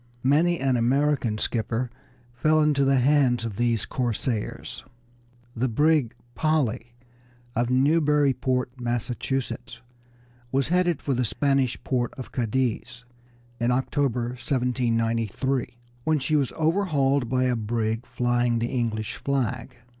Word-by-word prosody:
Many 165 +6 +3
an 130 -2 +1
American 125 -1 +1
skipper 115 +2 -1 0.4
fell 155 +6 +2
into 150 -2 +3
the 135 0 +3
hands 130 -3 +3
of 105 -4 -5
these 120 -2 +1
corsairs. 120 -2 -3 0.7
The 125 +3 0
brig 140 -1 +2 0.2
Polly 125 -6 0 0.6
of 120 +1 +1
Newburyport, 135 -2 +2
Massachusetts, 120 0 -3 0.7
was 135 +1 +1
heading 175 -1 +2
for 140 - -2
the 125 0 +1
Spanish 135 +1 +1
port 125 -2 -1
of 130 - -8
Cadiz 125 0 -2 0.5
in 120 0 +1
October, 125 -1 0
1793, 125 -1 -1 0.3
when 160 +2 +2
she 150 +3 0
was 140 -4 +1
overhauled 150 - +1
by 130 0 +1
a 125 -1 +2
brig 115 +1 -2
flying 120 -1 +1
the 115 +1 -2
English 110 -3 -2
flag. 130 -2 -2
125 Hz, 115 wpm, -25 LUFS, 120-140 Hz, 0.7 s, Many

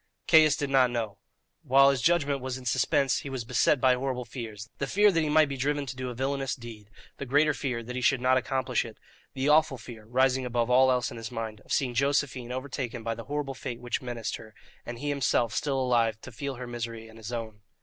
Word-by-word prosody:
Caius 155 -3 +6
did 140 -1 -3
not 130 -2 +5
know. 115 -4 -3 0.4
While 135 +2 +5
his 135 -3 -2
judgment 145 -4 +2
was 130 0 -4
in 130 - -11
suspense 130 +3 +2
he 140 - -7
was 130 -3 -4
beset 125 +4 +2
by 130 0 +5
horrible 125 -1 -2
fears 115 -3 -7
the 140 - -1
fear 205 +6 +4
that 165 -3 +1
he 155 - 0
might 155 0 +5
be 140 -1 -5
driven 145 +2 0
to 130 -1 -6
do 130 0 -4
a 125 - -6
villainous 135 +1 -1
deed, 115 -4 -11 0.3
the 140 - -5
greater 145 +4 +3
fear 125 -5 -3
that 125 +2 -7
he 125 - -2
should 135 +1 +3
not 130 +1 +3
accomplish 130 -2 0
it, 115 -2 -10 0.4
the 135 +1 -1
awful 150 -2 +4
fear, 115 -2 -11
rising 130 +2 +2
above 120 -1 -1
all 130 +1 +6
else 125 -1 +1
in - - -8
his 115 -1 -6
mind, 110 -2 -5
of - - -15
seeing 130 -4 +1
Josephine 135 -2 0
overtaken 130 -2 -4
by 115 - -1
the 115 0 -8
horrible 145 -1 -3
fate 125 -3 -6
which 120 0 -3
menaced 120 -3 -4
her, 110 -1 -14 0.3
and 120 - -5
he 145 +4 -3
himself 125 -5 +1
still 135 +2 0
alive 115 -4 +1
to - - -10
feel 140 +3 -5
her 125 +1 -7
misery 115 -2 -6
and 110 0 -14
his 110 +1 -7
own. 110 -3 -5
125 Hz, 235 wpm, -28 LUFS, 120-140 Hz, 0.4 s, Caius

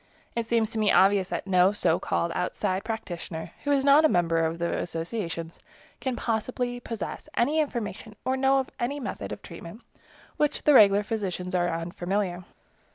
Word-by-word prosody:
It 230 -1 -2
seems 225 -1 +1
to 225 - -3
me 210 -1 +3
obvious 195 -1 +4
that - - -3
no 185 0 +4
so 175 -5 +1
called 170 - -1
outside 185 +2 -1
practitioner, 175 -7 -5
who 285 - 0
is 275 -1 +2
not 285 +2 +7
a 315 - +5
member 170 -3 +2
of 160 +1 -1
the 170 0 -1
associations, 165 -1 -4 0.4
can 260 -2 -2
possibly 245 +2 -2
possess 230 -3 -6
any 290 +7 +2
information 230 -7 -3
or 260 - +1
know 270 +1 +3
of 265 -1 -1
any 275 +5 -1
method 265 - -5
of - - -7
treatment - - -10 0.6
with 300 -1 +3
which - - -7
the 300 - +5
regular 205 -4 +7
physicians 195 -4 -3
are 175 -1 +2
unfamiliar. 175 +2 -2
205 Hz, 175 wpm, -27 LUFS, 175-245 Hz, 0.6 s, not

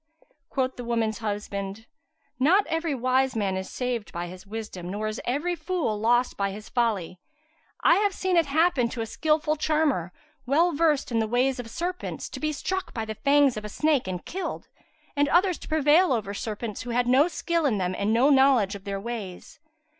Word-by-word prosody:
Quoth 260 -1 -1
the 245 - -5
woman's 230 -3 -1
husband, 205 -1 -4 0.5
"Not 360 +10 +4
every 325 -2 -1
wise 255 +1 +1
man 200 -3 0
is 190 0 -4
saved 245 -4 -3
by 175 +1 -4
his 185 +3 -10
wisdom, 205 -5 -6
nor 205 +3 -3
is 215 +1 -3
every 295 +8 0
fool 330 - -1
lost 240 +3 +2
by 200 0 0
his 210 +2 -9
folly. 205 -8 -1 0.6
I - - +5
have 410 0 +2
seen 375 -1 -1
it 335 -3 +3
happen 300 -4 +2
to 235 -1 -5
a - - -1
skilful 305 +4 0
charmer, 300 - +1 0.4
well 325 +7 +3
versed 305 -4 +1
in 230 - +1
the 220 - 0
ways 250 +3 +1
of 235 -2 -6
serpents, 355 +9 -4
to - - -7
be 310 0 -1
struck 375 +6 -3
by 225 -2 -2
the 220 - -4
fangs 280 +1 +3
of 210 - -5
a - - -5
snake[FN#172] 295 -1 +1
and 180 -1 -4
killed, 375 +2 -5 0.5
and 285 0 +2
others 360 0 +3
prevail 310 +2 +3
over 205 -4 -2
serpents 215 +1 -5
who 245 - -7
had 245 +1 +1
no 265 +6 +5
skill 335 -2 0
in 225 -6 +1
them 185 -1 -1
and 200 +3 0
no 250 +6 +4
knowledge 265 -7 +4
of 200 -1 -9
their 200 -1 -3
ways." 210 -4 -7
245 Hz, 195 wpm, -26 LUFS, 215-305 Hz, 0.6 s, I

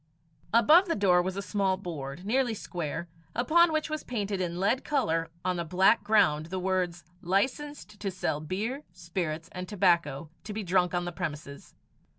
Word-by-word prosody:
Above 305 - +6
the 335 - 0
door 180 -3 +4
was 185 +2 -3
a 200 - -3
small 190 -1 0
board, 165 -3 -6
nearly 245 +1 +1
square, 170 -3 -4 0.3
upon 325 +8 +4
which 310 -1 0
was 310 -1 -4
painted 205 -5 -2
in 175 -1 -2
lead 220 +7 +1
colour 165 - 0 0.2
on 180 -1 0
a - - -1
black 190 +6 +3
ground 160 -8 +3
the 190 +2 -4
words, 180 -2 -1 0.2
"Licensed 230 - -2
to 200 - -2
sell 175 -5 -2
beer, 210 - -3
spirits, 170 -2 -4
and 180 0 -6
tobacco 170 -6 +1
to 210 - -6
be 215 0 -3
drunk 180 -1 +2
on 175 0 0
the 175 - -3
premises." 150 -3 -6
185 Hz, 170 wpm, -29 LUFS, 170-220 Hz, 0.3 s, Above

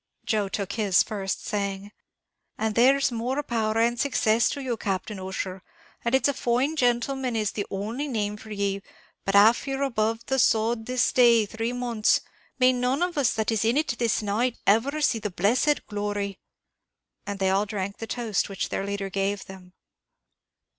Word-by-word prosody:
Joe 210 -3 0
took 195 -1 -3
his 200 -5 +3
first, 195 -2 -4
saying, 200 -1 -3 0.7
"And 220 0 -1
there's 265 +4 +4
more 250 +5 -2
power 225 -4 -1
and 235 +1 +2
success 230 -5 +2
to 285 - -4
you, 250 -3 -1
Captain 195 -1 -3
Ussher; 190 0 -5 0.4
and 235 +2 +2
it's 265 - +3
a 285 - +1
fine 255 +5 0
gentleman 250 -1 0
is 215 -2 0
the 205 -2 -4
only 220 +9 -3
name 210 -5 -2
for 220 - -13
ye; 200 -1 -2 0.4
but 195 - 0
av 220 +6 +5
you're 270 0 -1
above 225 -3 -1
the 265 0 0
sod 225 0 +2
this 255 0 +1
day 235 -3 +5
three 225 +3 -3
months, 240 -3 +1 0.4
may 255 -1 +5
none 250 +5 0
of 355 -1 -2
us 280 -5 +2
that 220 0 -1
is 220 -1 +1
in 230 +4 +2
it 300 -5 0
this 230 -2 +1
night 225 +4 0
ever 265 +9 +2
see 235 -6 +2
the 210 -1 -3
blessed 230 +11 +1
glory!" 205 -2 -3 0.9
And 200 -1 -3
they 190 -1 +1
all 200 +2 +1
drank 200 -1 -4
the 225 - -5
toast 225 -4 -1
which 195 - -3
their - - -2
leader 200 -1 -4
gave 195 +1 -1
them. 185 -1 -12
220 Hz, 180 wpm, -26 LUFS, 200-245 Hz, 0.9 s, av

